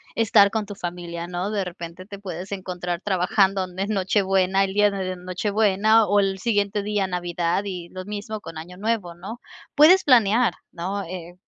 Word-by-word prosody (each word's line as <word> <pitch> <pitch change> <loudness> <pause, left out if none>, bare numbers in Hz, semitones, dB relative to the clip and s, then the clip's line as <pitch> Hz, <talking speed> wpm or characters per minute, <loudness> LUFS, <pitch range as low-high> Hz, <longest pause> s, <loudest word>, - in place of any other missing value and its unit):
estar 210 -3 +5
con 215 +1 -2
tu 205 0 -8
familia, 175 -2 -5
¿no?, 180 +3 -3
de 205 -2 0
repente 170 0 -8
te 200 0 -9
puedes 185 -1 -7
encontrar 180 -2 -4
trabajando 195 0 +2
donde 185 +1 -4
en 200 - -4
Nochebuena, 195 -1 +2
el 190 0 -2
día 210 +1 +4
de 190 -2 -3
Nochebuena, 205 +4 +2
o 205 +1 +3
el 195 -1 0
siguiente 205 0 0
día, 205 -1 0
Navidad, 175 0 -1
y 180 -3 -6
lo 185 0 -8
mismo 210 +1 -5
con 165 -3 -9
Año 175 +3 -9
Nuevo, 210 -4 -2
¿no?, 195 +7 -8 0.4
puedes 325 +6 +7
planear, 235 -4 +4 0.2
¿no?, 190 +4 -4
eh, 175 0 -8
195 Hz, 175 wpm, -23 LUFS, 180-205 Hz, 0.4 s, puedes